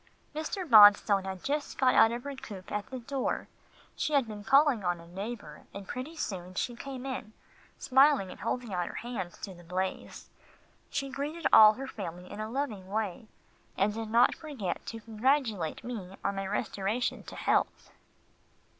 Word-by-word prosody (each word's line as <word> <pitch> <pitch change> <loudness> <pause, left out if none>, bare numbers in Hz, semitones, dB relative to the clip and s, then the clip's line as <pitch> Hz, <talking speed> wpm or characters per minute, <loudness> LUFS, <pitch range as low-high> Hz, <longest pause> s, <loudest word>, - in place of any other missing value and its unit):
Mrs. 315 +4 -4
Bonstone 205 -4 +7
had 190 -1 -6
just 290 +1 -2
got 260 -1 +4
out 225 - +6
of 240 +1 -4
her 285 - -5
coupé 200 -8 -9
at 210 +2 -3
the 260 - -5
door. 260 +2 -2 0.5
She 305 - -2
had 275 -5 +3
been 210 -1 -7
calling 275 -2 +4
on 175 -1 0
a 170 - -13
neighbour, 205 +5 -7
and 200 -1 -8
pretty 260 +6 -6
soon 185 - -5
she 240 +4 -2
came 265 +1 -7
in, 255 -5 -5 0.4
smiling 265 -7 +4
and - - -11
holding 245 -5 -3
out 175 -1 -1
her - - -8
hands 220 -8 -5
to 195 - -6
the 175 -1 -15
blaze. 185 +2 -4 0.6
She 275 -1 -2
greeted 295 +5 -4
all 215 -1 +10
her 270 +4 -6
family 180 -7 -7
in 205 - -7
a 215 0 -4
loving 225 -7 -3
way, 210 0 -3 0.5
and 200 +2 +2
did 225 0 -5
not 235 +2 +5
forget 265 - -5
to 225 0 -6
congratulate 225 - 0
me 200 -6 -6
on 200 - 0
my 195 0 -3
restoration 210 +2 -1
to - - -9
health. - - 0
220 Hz, 175 wpm, -30 LUFS, 195-265 Hz, 0.6 s, all